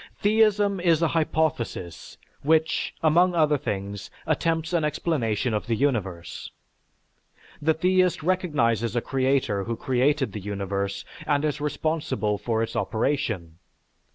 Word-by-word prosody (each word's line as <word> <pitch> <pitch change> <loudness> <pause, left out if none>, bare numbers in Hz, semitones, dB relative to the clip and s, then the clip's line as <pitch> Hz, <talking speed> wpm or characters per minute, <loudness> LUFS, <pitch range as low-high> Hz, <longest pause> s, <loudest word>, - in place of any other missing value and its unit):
Theism 205 -2 +3
is 170 -2 +3
a 165 - +3
hypothesis 155 - -2 0.2
which, 160 +2 +1
among 175 +3 +4
other 150 -3 +3
things, 100 -2 -4 0.2
attempts 165 +1 0
an 170 -2 +2
explanation 135 -7 0
of 105 +1 -2
the 115 - +1
universe. 100 - -2 1.1
The 155 +1 +2
theist 185 +1 +2
recognizes 130 - +1
a 120 - +2
creator 130 -7 0
who 115 - -2
created 135 +3 +1
the 105 - -5
universe 100 0 -3 0.2
and 145 0 +2
is 150 -1 -2
responsible 150 -9 -1
for 115 -1 0
its 115 - -5
operation. 110 - -1
140 Hz, 125 wpm, -25 LUFS, 110-160 Hz, 1.1 s, among